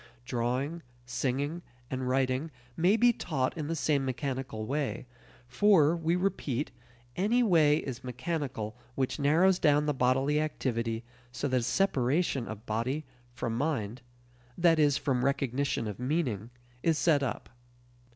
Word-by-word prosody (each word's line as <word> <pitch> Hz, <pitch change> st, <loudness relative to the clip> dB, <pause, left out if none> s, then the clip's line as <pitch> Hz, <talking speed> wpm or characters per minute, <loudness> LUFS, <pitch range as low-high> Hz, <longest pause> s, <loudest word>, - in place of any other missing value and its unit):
Drawing, 130 Hz, +7 st, -1 dB, 0.2 s
singing, 140 Hz, +6 st, -2 dB, 0.3 s
and 130 Hz, -1 st, -2 dB
writing 130 Hz, +3 st, +1 dB, 0.3 s
may 185 Hz, +6 st, +3 dB
be 240 Hz, +1 st, +5 dB
taught 135 Hz, -, -2 dB
in 155 Hz, -3 st, -4 dB
the 165 Hz, -, -1 dB
same 145 Hz, -3 st, +1 dB
mechanical 130 Hz, -3 st, -3 dB
way; 140 Hz, +1 st, -2 dB, 0.4 s
for, 160 Hz, +3 st, +4 dB
we 165 Hz, 0 st, 0 dB
repeat, 175 Hz, -8 st, -1 dB, 0.4 s
any 225 Hz, +7 st, +2 dB
way 160 Hz, -8 st, +5 dB
is 130 Hz, -4 st, -5 dB
mechanical 125 Hz, -3 st, -3 dB, 0.2 s
which 130 Hz, +2 st, -1 dB
narrows 170 Hz, +6 st, +4 dB
down 150 Hz, 0 st, +4 dB
the 150 Hz, -, +1 dB
bodily 135 Hz, +3 st, +2 dB
activity 115 Hz, -6 st, -2 dB, 0.3 s
so 135 Hz, +3 st, -2 dB
that 130 Hz, -, +2 dB
a -, -, -4 dB
separation 135 Hz, -3 st, +1 dB
of 110 Hz, +1 st, -8 dB
body 125 Hz, +8 st, -2 dB, 0.3 s
from 120 Hz, -2 st, -3 dB
mind 125 Hz, -4 st, -2 dB, 0.6 s
that 170 Hz, -2 st, +4 dB
is, 145 Hz, -2 st, +4 dB
from 125 Hz, -3 st, 0 dB
recognition 135 Hz, -3 st, 0 dB
of 105 Hz, 0 st, -6 dB
meaning 125 Hz, -, -1 dB, 0.3 s
is 165 Hz, +1 st, +2 dB
set 150 Hz, -4 st, +3 dB
up. 135 Hz, -4 st, -3 dB
140 Hz, 140 wpm, -30 LUFS, 125-160 Hz, 0.6 s, be